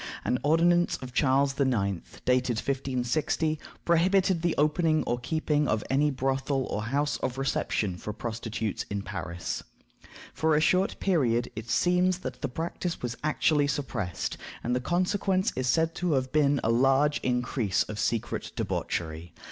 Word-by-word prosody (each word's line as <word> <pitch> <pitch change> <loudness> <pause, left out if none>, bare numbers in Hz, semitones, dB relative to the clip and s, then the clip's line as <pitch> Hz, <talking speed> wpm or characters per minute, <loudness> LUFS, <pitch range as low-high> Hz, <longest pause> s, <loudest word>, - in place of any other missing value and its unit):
An 125 - +1
ordinance 175 +3 +3
of 125 -1 -9
Charles 135 +1 +2
IX., 105 -9 +1 0.3
dated 125 -2 +2
1560, 135 +4 -1 0.3
prohibited 180 +1 +3
the 170 -1 +1
opening 155 +1 +2
or 120 - -1
keeping 150 +2 0
of 110 -1 0
any 145 +2 +3
brothel 135 0 -1
or 105 - -1
house 145 +4 0
of 130 0 -3
reception 105 -8 -1
for 105 - -5
prostitutes 110 -1 -3
in 100 -1 -3
Paris. 85 -2 -4 0.7
For 160 -1 +2
a - - +4
short 185 +5 +2
period 125 -10 +1
it 110 +2 -7
seems 180 +3 +3
that - - -5
the - - -1
practice 165 +4 -4
was 120 -1 -2
actually 150 -1 +2
suppressed, 125 -10 -3 0.3
and 120 +1 0
the 125 - 0
consequence 185 +4 +1
is 130 -1 -1
said 160 +4 +2
to 180 -3 0
have 130 -1 0
been 145 -2 +3
a 115 - +2
large 135 +4 +3
increase 125 -5 0
of 105 -1 -7
secret 110 +2 -2
debauchery. 80 0 -3
135 Hz, 150 wpm, -28 LUFS, 120-160 Hz, 0.7 s, a